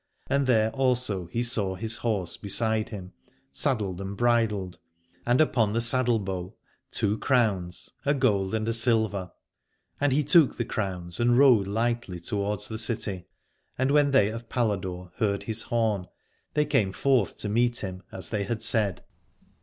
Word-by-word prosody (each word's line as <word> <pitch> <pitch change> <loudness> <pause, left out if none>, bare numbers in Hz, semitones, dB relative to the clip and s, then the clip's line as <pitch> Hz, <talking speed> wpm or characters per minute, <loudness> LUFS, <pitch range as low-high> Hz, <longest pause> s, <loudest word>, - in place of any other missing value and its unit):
And 140 -1 0
there 110 -3 +3
also 125 -9 +1
he 115 +8 -2
saw 105 -6 0
his 110 +3 +1
horse 105 -7 -1
beside 110 +2 0
him 95 -4 -8 0.4
saddled 95 - -1
and 100 +1 -6
bridled, 105 -7 0 0.5
and 120 +1 +3
upon 115 -9 +2
the 115 - +1
saddle 120 0 +4
bow 95 -3 -5 0.3
two 105 +2 -1
crowns, 100 -9 0
a 145 +1 +2
gold 105 -7 +1
and 110 0 -2
a 115 - +1
silver. 110 -6 +1 0.7
And 145 -1 +2
he 145 +3 +2
took 150 0 +4
the 120 - -1
crowns 90 -5 -4
and 120 0 +3
rode 125 -8 +5
lightly 115 -3 -2
towards 105 +3 -2
the 110 -1 -5
city: 105 -5 -2 0.5
and 130 +2 +1
when 145 -1 +4
they 130 -7 +4
of 115 +1 -8
Paladore 95 -6 -2
heard 100 -2 0
his 110 0 -3
horn 110 -6 -1 0.5
they 150 0 +3
came 95 -8 +1
forth 130 -2 +1
to - - -3
meet 120 +3 +1
him, 95 -1 -5
as 95 - -6
they 105 -3 -1
had 110 +1 -3
said. 105 -5 0
110 Hz, 160 wpm, -26 LUFS, 95-120 Hz, 0.7 s, rode